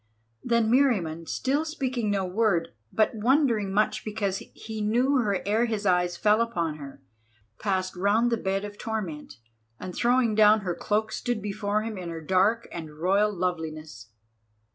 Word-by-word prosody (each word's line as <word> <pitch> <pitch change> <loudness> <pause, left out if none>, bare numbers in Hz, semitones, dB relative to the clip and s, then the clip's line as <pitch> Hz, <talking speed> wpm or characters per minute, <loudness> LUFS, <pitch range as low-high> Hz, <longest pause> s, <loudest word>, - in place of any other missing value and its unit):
Then 235 -2 +2
Meriamun, 190 - +2
still 280 +4 0
speaking 260 -8 -2
no 195 -2 0
word, 180 -3 +1 0.2
but 215 - +2
wondering 230 -3 +2
much 210 +2 +1
because 205 -3 -2
he 220 -1 -8
knew 245 +6 +2
her 205 -6 0
ere 215 +4 +2
his 220 -3 -3
eyes 180 -2 +2
fell 215 +3 +3
upon 170 -9 -1
her, 140 -2 -11 0.6
passed 185 -2 -1
round 210 +6 +2
the 230 - +2
bed 195 -1 -2
of 205 0 -9
torment, 200 -10 -5 0.4
and 185 - -6
throwing 240 0 +2
down 215 0 +5
her 180 -3 -2
cloak 215 +4 -1
stood 245 0 -2
before 205 +1 -2
him 220 -3 -5
in 175 -2 -6
her 165 -1 -5
dark 190 +8 +2
and 155 -3 -8
royal 195 +5 +2
loveliness. 160 - -4
205 Hz, 160 wpm, -26 LUFS, 180-225 Hz, 0.6 s, down